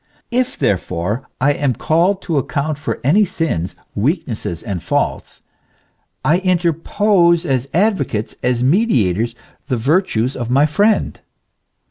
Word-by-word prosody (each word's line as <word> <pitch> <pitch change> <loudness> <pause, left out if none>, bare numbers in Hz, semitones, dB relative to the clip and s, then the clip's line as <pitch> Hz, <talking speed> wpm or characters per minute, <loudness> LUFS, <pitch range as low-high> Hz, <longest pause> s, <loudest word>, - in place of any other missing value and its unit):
If 250 +1 0
therefore 90 +4 -1
I 145 +3 +3
am 140 -4 0
called 180 +5 +1
to 160 -5 0
account 145 +2 -2
for 145 - -3
any 170 - +4
sins, 160 - -2 0.2
weaknesses 110 - -2
and 100 -6 -4
faults, - - -2 0.8
I 165 +4 +4
interpose 175 0 +2
as 135 -2 -1
advocates, 180 - 0
as 125 -1 0
mediators, 120 - +2 0.3
the 130 -3 0
virtues 130 - +1
of 120 -2 -4
my 135 +4 +4
friend. 205 +9 +1
145 Hz, 120 wpm, -18 LUFS, 120-180 Hz, 0.8 s, any